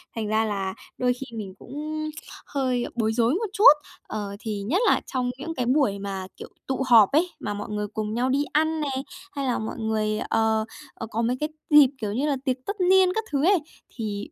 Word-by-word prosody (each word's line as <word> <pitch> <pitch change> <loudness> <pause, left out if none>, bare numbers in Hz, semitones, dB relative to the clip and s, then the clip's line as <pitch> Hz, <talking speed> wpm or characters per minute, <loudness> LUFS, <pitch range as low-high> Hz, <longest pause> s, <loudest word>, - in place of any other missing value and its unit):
Thành 220 -2 -2
ra 220 +1 +2
là 195 -3 -2 0.2
đôi 250 -1 +2
khi 245 -2 -9
mình 200 -3 -6
cũng 310 +3 -5 0.4
hơi 255 -3 -1
bối 220 -2 +1
rối 235 +2 +2
một 435 +6 -1
chút. 420 -4 +9 0.3
Ờ, 205 -2 -5
thì 210 -2 -4
nhất 285 - 0
là - - +4
trong 255 -2 -2
những 325 +4 -5
cái 250 - -1
buổi 250 -6 +2
mà, 195 -1 -5
kiểu, - - -9 0.2
tụ 265 0 -1
họp 225 -5 +7
ấy, 330 +5 +3
mà 210 -7 -3
mọi 205 - -6
người 210 0 -2
cùng 215 0 -4
nhau 245 +3 0
đi 275 +2 +2
ăn 315 +1 +2
nè, 295 - -1 0.4
hay 280 -6 -3
là 250 - 0
mọi 220 +2 -5
người, 215 -1 0
ờ, 220 -1 +1 0.3
ờ, 225 - -6
có 225 - -1
mấy 240 +2 0
cái 300 - 0 0.2
dịp, 295 -3 +8
kiểu 210 -4 -3
như 270 +7 0
là, 285 -2 +1
tiệc 260 -2 +1
tất 405 -1 -4
niên 375 -1 +5
các 445 - 0
thứ 285 +1 +1
ấy, 385 0 +5 0.4
thì 210 -3 -4
245 Hz, 220 wpm, -25 LUFS, 215-295 Hz, 0.4 s, chút